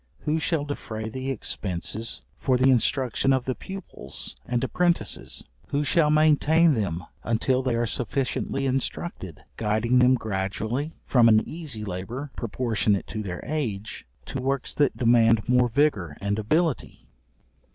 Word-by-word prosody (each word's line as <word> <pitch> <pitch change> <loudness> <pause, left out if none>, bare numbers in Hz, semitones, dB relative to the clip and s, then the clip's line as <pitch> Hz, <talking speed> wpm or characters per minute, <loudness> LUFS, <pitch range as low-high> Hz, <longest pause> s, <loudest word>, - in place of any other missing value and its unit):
Who 155 +2 0
shall 155 -2 0
defray 110 -6 -5
the 130 +3 -4
expences 105 -2 -3 0.2
for 130 -2 +2
the 130 +1 +5
instruction 130 +1 +2
of 130 -2 +2
the 130 - 0
pupils 195 +8 -8
and 120 0 0
apprentices? 170 - 0 0.2
Who 145 +1 0
shall 150 0 +3
maintain 155 +1 +4
them 95 -7 -2 0.2
until 120 +3 +1
they 130 -2 0
are 120 0 +1
sufficiently 135 +3 -2
instructed, 130 - -3
guiding 115 +3 +2
them 125 +1 +6
gradually 110 +7 -3
from 120 -3 +5
an 110 -1 +4
easy 150 -10 -5
labour 110 +10 -5
proportionate 110 -3 0
to 110 - -4
their 90 -4 -5
age, 115 - -4 0.2
to 135 - -4
works 135 0 -1
that 145 -3 +1
demand 115 -2 +4
more 125 -1 +4
vigour 110 - +1
and 100 +1 -1
ability? 150 - -1
125 Hz, 140 wpm, -25 LUFS, 110-140 Hz, 0.2 s, them